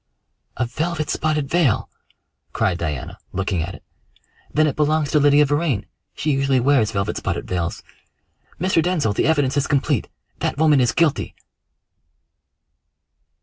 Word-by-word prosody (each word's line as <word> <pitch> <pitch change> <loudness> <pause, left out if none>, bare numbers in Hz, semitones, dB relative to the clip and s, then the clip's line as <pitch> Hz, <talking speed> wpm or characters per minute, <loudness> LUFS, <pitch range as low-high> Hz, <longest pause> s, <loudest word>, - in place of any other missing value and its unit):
"A 130 - +1
velvet 155 +5 -2
spotted 155 -2 0
veil!" 155 -6 +2 0.7
cried 90 -2 0
Diana, 75 -6 -4
looking 95 -2 -1
at 85 +4 -5
it. - - -15 0.7
"Then 155 +1 +3
it 150 - 0
belongs 150 -1 +1
to 150 - +4
Lydia 145 +1 +5
Vrain. 145 -6 0 0.3
She 155 - -1
usually 135 -1 +2
wears 125 -4 +3
velvet 100 -2 -2
spotted - - -3
veils. 85 -2 -3 0.8
Mr. 180 -1 +2
Denzil, 160 - 0
the 105 - +1
evidence 145 -4 +2
is 140 - +1
complete 140 -3 0 0.3
that - - -2
woman 150 -3 +4
is 120 -3 +2
guilty!" 160 0 0
145 Hz, 140 wpm, -21 LUFS, 115-155 Hz, 0.8 s, Lydia